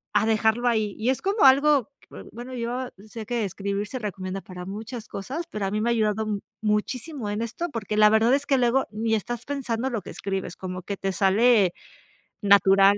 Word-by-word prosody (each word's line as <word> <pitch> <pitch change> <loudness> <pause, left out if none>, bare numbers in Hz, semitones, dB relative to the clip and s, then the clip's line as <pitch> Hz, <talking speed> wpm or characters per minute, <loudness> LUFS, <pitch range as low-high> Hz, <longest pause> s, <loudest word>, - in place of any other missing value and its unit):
a 210 - +4
dejarlo 220 +2 +2
ahí, 215 -4 +1
y 235 +4 0
es 260 - 0
como 395 -5 +3
algo, 275 -2 +5
que - - -23 0.2
bueno, 245 +3 -8
yo 245 +1 -3 0.2
sé 220 0 -7
que 235 0 -1
escribir 200 +2 -3
se 260 - -5
recomienda 190 -2 -4
para 180 -1 -9
muchas 220 +3 -6
cosas, 275 - -5
pero 210 -2 -3
a 195 - -2
mí 215 0 -1
me 235 - +1
ha - - +3
ayudado 215 0 +1
m 205 -2 -1 0.2
muchísimo 225 +4 -2
en 210 - -2
esto, 240 +10 -3
porque 215 -2 -3
la 210 0 +7
verdad 225 +3 +4
es 280 0 -2
que 275 - +2
luego 245 +2 +2
ni 220 +1 0
estás 240 +2 -4
pensando 265 -3 -2
lo 230 -5 -3
que - - -8
escribes, 195 -1 -4
como 185 -1 -6
que 200 - -4
te 195 0 -2
sale 200 0 +4 0.7
natural. 195 -1 +6
220 Hz, 210 wpm, -25 LUFS, 200-245 Hz, 0.7 s, la